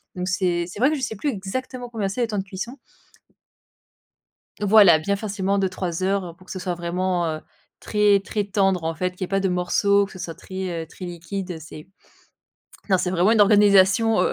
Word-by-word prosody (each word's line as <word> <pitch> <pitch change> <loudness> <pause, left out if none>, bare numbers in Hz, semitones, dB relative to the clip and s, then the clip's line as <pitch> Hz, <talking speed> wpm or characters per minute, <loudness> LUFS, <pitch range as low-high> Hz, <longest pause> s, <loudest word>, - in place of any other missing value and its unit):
Donc 180 0 -3
c'est 180 -2 0
c'est 185 - -9
vrai 260 +4 +4
que 310 - 0
je 280 - -5
sais 225 -3 -3
plus 290 +9 -2
exactement 245 +3 -5
combien 220 -4 -2
c'est, 205 +6 -3
les 235 - +1
temps 210 -2 -2
de - - -2
cuisson. 200 +7 -7 1.8
Voilà, 200 -5 +7
bien 200 +5 -1
facilement 200 -1 -1
2-3 185 -2 -2
heures 185 -3 -1
pour 185 - -18
que - - -11
ce 190 - -5
soit 180 -1 -3
vraiment, 175 +1 -1
heu, 155 0 -4 0.4
très, 210 -2 +3
très 205 +1 -3
tendre, 195 -4 +1
en 165 0 -1
fait, 180 +3 -1
qu'il 180 - -22
y - - +1
ait - - -13
pas 195 +1 0
de 190 - +1
morceaux, 200 +3 +2
que 200 - -13
ce 190 - -11
soit 165 -2 -5
très, 180 -1 -5
heu, - - -13
très 185 - -12
liquide, 180 +2 -6
heu, 165 - -6
c'est 155 0 -11 1.0
non 190 - +4
c'est 180 - -1
vraiment 185 +3 +3
une 225 -1 +4
organisation, 205 +1 +5
heu - - +1
190 Hz, 220 wpm, -23 LUFS, 180-205 Hz, 1.8 s, Voilà